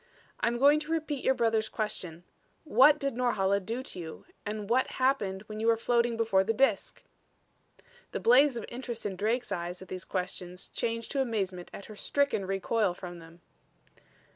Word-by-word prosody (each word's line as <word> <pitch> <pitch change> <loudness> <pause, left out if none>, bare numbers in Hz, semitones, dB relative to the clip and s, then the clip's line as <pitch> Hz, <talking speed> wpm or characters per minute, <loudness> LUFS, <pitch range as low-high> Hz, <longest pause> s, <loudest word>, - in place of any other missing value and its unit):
"I'm 235 +1 +1
going 285 +4 +6
to 305 +1 -7
repeat 310 -4 -2
your 265 - +3
brother's 225 -2 +1
question 180 -6 -4 0.4
what 295 -1 +6
did 275 -1 -2
Norhala 205 -5 +1
do 230 +6 -4
to 185 - -7
you? 160 -2 -8 0.2
And 210 -1 -4
what 250 +4 +3
happened 215 -8 +1
when 215 0 -8
you 225 - 0
were 230 0 +5
floating 235 0 +1
before 220 -4 +3
the 225 +3 0
Disk?" 270 +3 +1 1.1
The - - -3
blaze 255 +2 +5
of 230 - -4
interest 240 -2 -6
in 200 -2 -2
Drake's 225 +6 -1
eyes 175 +1 -3
at 190 - -12
these 185 0 -5
questions 180 -1 -4
changed 230 -1 -3
to 275 - +1
amazement 195 -8 -2
at 200 - -9
her 215 - -10
stricken 280 -4 0
recoil 195 0 0
from 175 -1 -8
them. 165 +1 -15
225 Hz, 175 wpm, -30 LUFS, 190-250 Hz, 1.1 s, going